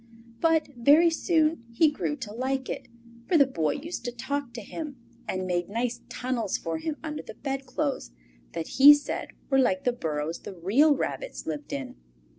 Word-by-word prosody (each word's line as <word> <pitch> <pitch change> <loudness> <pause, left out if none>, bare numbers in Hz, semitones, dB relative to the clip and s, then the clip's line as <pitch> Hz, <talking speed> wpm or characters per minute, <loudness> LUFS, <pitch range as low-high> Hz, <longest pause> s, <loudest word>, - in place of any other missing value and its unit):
But 325 -2 +3
very 295 +8 +6
soon 320 -4 +1
he 300 +6 +4
grew 295 0 -2
to 235 -7 -7
like 260 +2 -2
it, - - -5 0.4
for 345 - +4
the 280 - +7
Boy 165 - 0
used 320 +5 -5
to 245 - -1
talk 260 +2 -3
to 235 - -5
him, 300 +6 -6 0.3
and 185 0 -2
made 175 -1 -1
nice 235 +3 -2
tunnels 245 -5 -2
for 165 -1 -3
him 305 - -3
under 305 -2 -4
the - - -10
bedclothes 270 - -3 0.4
that 160 - -3
he 285 +2 +9
said 290 - -4 0.2
were 270 - +5
like 190 -8 +2
the 245 - +2
burrows 160 -5 -3
the 195 - -8
real 245 - +4
rabbits - - -4
lived 150 -2 -5
in. 135 - -5
260 Hz, 180 wpm, -27 LUFS, 195-295 Hz, 0.4 s, he